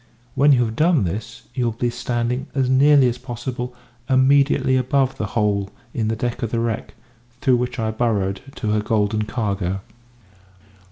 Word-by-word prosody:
When 145 +1 +4
you 120 -2 +3
have 110 0 -4
done 160 - +3
this, 105 +6 -5
you 125 -1 -1
will 115 - 0
be 120 +2 -1
standing, 120 +1 -2
as 135 -2 +2
nearly 140 0 +6
as 120 0 -2
possible, 125 0 -5 0.3
immediately 135 0 +4
above 130 +1 +1
the 105 - -2
hole 100 -2 +1 0.2
in 110 -3 -1
the 110 - 0
deck 120 +2 -3
of 115 - -1
the 115 - -1
wreck, 115 -2 -3 0.4
through 125 -1 +3
which 125 +1 -3
I 110 -2 -1
burrowed 105 -4 0
to 110 -3 -2
her 105 0 +2
golden 105 -1 0
cargo." 100 -5 -2
120 Hz, 170 wpm, -21 LUFS, 110-130 Hz, 0.4 s, nearly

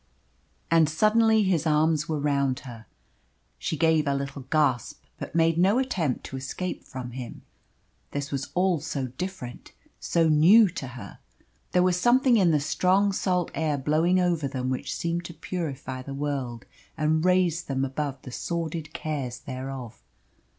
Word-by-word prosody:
And 165 -2 +5
suddenly 220 +5 +4
his 175 -4 +1
arms 155 0 +2
were 155 -2 -1
round 140 -2 0
her. 115 -4 -11 0.7
She 155 - -2
gave 160 -2 +3
a 140 - +2
little 140 0 -4
gasp, 135 -2 0 0.2
but - - -7
made 165 0 +3
no 195 +6 +4
attempt 190 - -1
to 135 - -6
escape 155 +7 -4
from 125 -2 -7
him. 125 -1 -8 0.7
This 145 0 -4
was 140 -1 -3
all 180 -2 +2
so 135 -2 -3
different, 130 -3 -7 0.3
so 165 -1 +2
new 175 +9 +7
to 155 -6 -6
her. 100 -4 -10 0.5
There 180 - +3
was 180 -1 +2
something 250 +1 +4
in 185 -5 +4
the 155 -2 +3
strong 185 +7 +2
salt 180 -2 0
air 155 -3 0
blowing 160 +6 +2
over 170 -5 +1
them 130 -1 -3
which 130 - -3
seemed 170 +1 -2
to 170 - -8
purify 145 -6 -5
the 135 +1 -7
world 135 -5 -3 0.3
and 155 +1 +1
raise 180 -2 +2
them 135 -1 -1
above 135 0 -4
the 125 - -8
sordid 165 +1 -4
cares 135 -6 -4
thereof. 130 -3 -7
155 Hz, 155 wpm, -26 LUFS, 135-175 Hz, 0.7 s, new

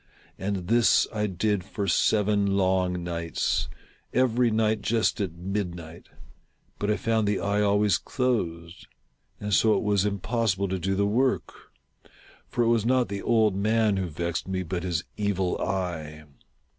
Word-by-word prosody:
And 95 -2 -3
this 115 +2 +4
I 105 -1 0
did 100 +1 -1
for 100 +2 -4
seven 100 -1 +2
long 95 -2 +1
nights 85 -1 -1 0.2
— - - -35
every 125 -1 +2
night 110 0 +1
just 115 0 +1
at 95 -5 -2
mid 95 0 -3
night— 85 0 -11 0.7
but 105 - -1
I 105 - +2
found 110 -2 0
the 100 -1 +1
eye 100 +1 0
always 105 -1 +3
closed; 85 -10 -2 0.5
and 105 0 -3
so 110 +4 +4
it - - -2
was 100 -2 +2
impossible 100 0 0
to 95 0 -2
do 95 +3 -1
the 100 +1 +1
work; 125 +6 0 1.0
for 120 - 0
it - - +1
was 115 -2 +2
not 125 +1 +2
the 100 -1 -4
old 110 -4 +2
man 105 0 +2
who 95 -1 -1
vexed 85 +2 -3
me, 95 -1 -2
but 90 +1 -3
his 85 -3 -2
Evil 95 -3 -1
Eye. 85 -5 -3
100 Hz, 160 wpm, -26 LUFS, 90-110 Hz, 1.0 s, this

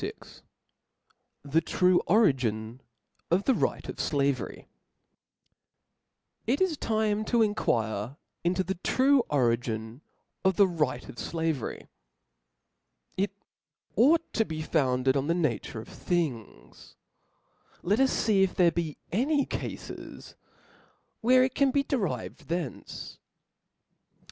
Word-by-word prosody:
Vt - - -8 1.0
The 145 +3 +2
true 180 +2 +3
Origin 130 - +2 0.5
of 180 +4 +2
the 265 - +3
Right - - -1
of - - -6
Slavetp 140 -4 -1 1.8
T 245 - +3
T - - +3
is 365 -4 0
time 215 -4 0
to 235 -1 +3
enquire 115 - -1 0.3
into 180 +2 +1
the 190 - -2
true 270 +1 +4
origin 115 -2 0 0.4
of 190 -1 +3
thtf 190 -3 +3
•*• - - -3
right 130 -4 0
of - - -11
flavery^ 160 -3 -3 1.3
It 200 +2 0 0.6
ought 315 - +4
to 225 - +3
be 155 -5 -5
founded 130 -4 +1
on 135 +1 0
the 165 - +2
nature 155 -8 -1
of 110 - -9
things 150 - -4 0.5
\ - - -35
let 205 +6 +2
us 270 0 +2
fee 210 -4 +4
if 190 -1 +2
there 175 -2 +5
be 165 -3 -3
any 280 - +2
cafes - - -7 0.9
where 255 +2 +5
it 260 - 0
can 280 -1 +3
be 275 +1 +2
derived 250 - -2
from 150 - -20
theoce. 155 -8 -7
175 Hz, 125 wpm, -28 LUFS, 135-220 Hz, 1.8 s, there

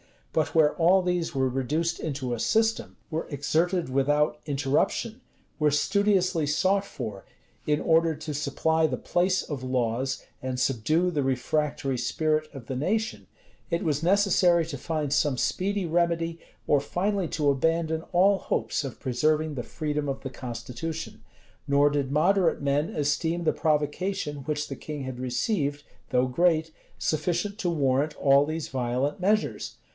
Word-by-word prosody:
But 160 0 0
where 155 -2 +5
all 180 +2 +4
these 180 -4 -1
were 130 -1 +2
reduced 150 +7 -1
into 135 -5 -3
a 120 - -3
system, 225 - +1 0.2
were 160 +1 -2
exerted 165 +3 0
without 145 +3 +1
interruption, 145 - 0 0.4
were 150 -1 +4
studiously 185 +1 +2
sought 190 +7 +2
for, 110 - -7 0.4
in 150 0 +2
order 165 0 +3
to 155 0 -6
supply 160 +3 +1
the 130 -4 -2
place 180 +6 +1
of 145 -4 -5
laws, 130 +1 -1 0.2
and 130 -1 -3
subdue 155 +9 +1
the 150 -4 0
refractory 135 0 -1
spirit 155 +4 0
of 135 -5 -10
the 130 - -4
nation, 180 - -1 0.4
it 170 - -1
was 150 -2 0
necessary 180 -2 +4
to 145 -4 -5
find 150 0 -2
some 145 -3 +2
speedy 195 +7 0
remedy, 170 0 0 0.3
or 145 - +4
finally 190 +6 -1
to 150 -3 +1
abandon 160 +3 0
all 190 +2 +4
hopes - - -1
of 135 - -7
preserving 155 +5 +1
the 125 -4 -4
freedom 150 0 -3
of 135 - -3
the 135 - -6
constitution. 130 +6 -6 0.4
Nor 140 +1 +4
did 140 -2 -1
moderate 175 +3 +3
men 145 +2 +1
esteem 160 +4 -1
the 160 - +2
provocation 150 +1 -1
which 150 0 -2
the 135 - -6
king 150 -2 -6
had 130 -1 -6
received, 145 - -1 0.3
though 125 0 +2
great, 160 +3 +2 0.3
sufficient 175 +6 -1
to 180 - 0
warrant 145 -2 +1
all 140 0 +4
these 155 +1 -4
violent 130 +4 -1
measures. 210 +3 0
150 Hz, 150 wpm, -27 LUFS, 135-170 Hz, 0.4 s, where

